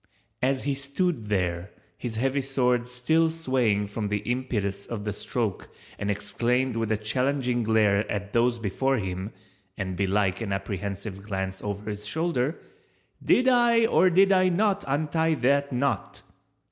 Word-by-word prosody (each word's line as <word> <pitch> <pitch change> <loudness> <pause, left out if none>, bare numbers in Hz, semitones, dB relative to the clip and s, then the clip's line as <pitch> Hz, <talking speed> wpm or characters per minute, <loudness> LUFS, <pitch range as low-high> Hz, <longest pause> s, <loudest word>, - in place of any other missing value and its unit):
As 130 +1 +1
he 140 - 0
stood 140 - -2
there, 90 -2 -1 0.3
his 120 -3 -5
heavy 135 +4 0
sword 125 -2 +1
still 160 +7 +2
swaying 130 -10 +1
from 105 +1 -3
the 105 0 0
impetus 110 -6 -2
of 110 -3 -5
the 105 - -2
stroke 110 -2 -3 0.3
and 100 - -2
exclaimed 120 +4 0
with 115 -1 -1
a 110 - +2
challenging 125 +2 0
glare 110 -2 +2
at 100 0 -4
those 120 +1 +3
before 130 +5 0
him 95 0 -4 0.5
(and 95 -2 -3
belike 95 0 +1
an 100 -3 -2
apprehensive 100 +1 -4
glance 95 -2 -4
over 105 0 -5
his 105 0 -4
shoulder), 160 0 -1 0.7
"Did 255 - +4
I 240 -2 +5
or 185 -4 +4
did 195 +3 +5
I 185 -1 +4
not 200 +2 +1
untie 155 +3 +1
that 140 +2 +2
knot?" 125 -5 -2
120 Hz, 150 wpm, -26 LUFS, 100-140 Hz, 0.7 s, I